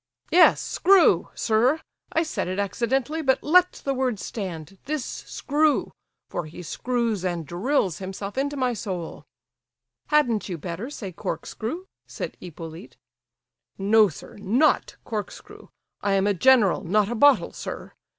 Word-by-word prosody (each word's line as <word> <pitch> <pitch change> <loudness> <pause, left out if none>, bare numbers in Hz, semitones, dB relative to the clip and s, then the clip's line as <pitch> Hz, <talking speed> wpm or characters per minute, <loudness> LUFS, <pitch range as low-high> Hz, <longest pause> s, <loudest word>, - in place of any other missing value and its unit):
Yes, 355 - +6
screw, 345 - +4
sir; 240 +7 +2 0.3
I 325 - +2
said 315 - -3
it 185 +1 -3
accidentally, 245 +9 -1
but 265 -3 +1
let 360 +4 +5
the 275 - +1
word 255 -5 -1
stand—this 195 - -5
screw, 300 +1 0 0.4
for 175 -3 -4
he 170 +3 -10
screws 230 +2 -1
and 175 -3 -2
drills 185 - 0
himself 195 +1 -6
into 285 +2 -1
my 255 -2 +1
soul—" 185 -7 -5 0.8
"Hadn't 245 -10 +2
you 175 - -3
better 175 - -5
say 205 -10 -7
corkscrew?" 230 - -5 0.2
said - - -6
Hippolyte. 165 0 -10 0.8
"No, 210 +2 +5
sir, 155 - -12
not 235 +10 +2
corkscrew. 215 -3 -7 0.3
I 200 - +1
am 195 0 +2
a 205 - +3
general, 215 -3 +4
not 200 +3 +2
a 235 - -3
bottle, 285 +4 +4
sir. - - -7
220 Hz, 135 wpm, -25 LUFS, 185-270 Hz, 0.8 s, Yes